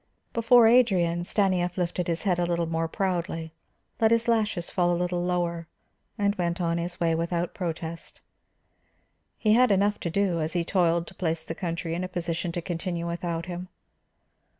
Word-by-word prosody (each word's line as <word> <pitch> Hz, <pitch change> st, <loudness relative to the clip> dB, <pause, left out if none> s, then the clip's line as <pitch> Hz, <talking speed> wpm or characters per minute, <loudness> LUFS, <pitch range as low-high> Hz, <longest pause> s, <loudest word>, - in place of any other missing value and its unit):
Before 230 Hz, +1 st, +6 dB
Adrian, 190 Hz, -8 st, +4 dB
Stanief 180 Hz, -3 st, +1 dB
lifted 180 Hz, 0 st, -1 dB
his 170 Hz, -1 st, -1 dB
head 180 Hz, -4 st, +1 dB
a -, -, +2 dB
little 170 Hz, -1 st, 0 dB
more 165 Hz, 0 st, -1 dB
proudly, 170 Hz, -3 st, -2 dB, 0.5 s
let 220 Hz, -, +4 dB
his 230 Hz, +1 st, +2 dB
lashes 215 Hz, -6 st, +1 dB
fall 175 Hz, -1 st, +2 dB
a 175 Hz, -, +1 dB
little 175 Hz, 0 st, -1 dB
lower, 175 Hz, -2 st, -1 dB, 0.5 s
and 200 Hz, 0 st, +2 dB
went 170 Hz, 0 st, -1 dB
on 170 Hz, -1 st, 0 dB
his 175 Hz, +1 st, -4 dB
way 165 Hz, -2 st, +2 dB
without 170 Hz, +1 st, -1 dB
protest. 165 Hz, -2 st, -5 dB, 1.2 s
He 215 Hz, -1 st, +3 dB
had 250 Hz, +2 st, +5 dB
enough 205 Hz, +1 st, +2 dB
to 170 Hz, -, -3 dB
do, 180 Hz, -2 st, +1 dB
as 155 Hz, +1 st, -2 dB
he 175 Hz, -2 st, 0 dB
toiled 170 Hz, -2 st, +2 dB
to -, -, -12 dB
place 165 Hz, -2 st, -2 dB
the -, -, -5 dB
country 170 Hz, -1 st, -3 dB
in 175 Hz, +2 st, -2 dB
a -, -, -2 dB
position 170 Hz, -1 st, -2 dB
to 175 Hz, -, -3 dB
continue 175 Hz, -1 st, -3 dB
without 170 Hz, -1 st, -3 dB
him. 180 Hz, 0 st, -6 dB
175 Hz, 175 wpm, -26 LUFS, 170-190 Hz, 1.2 s, Before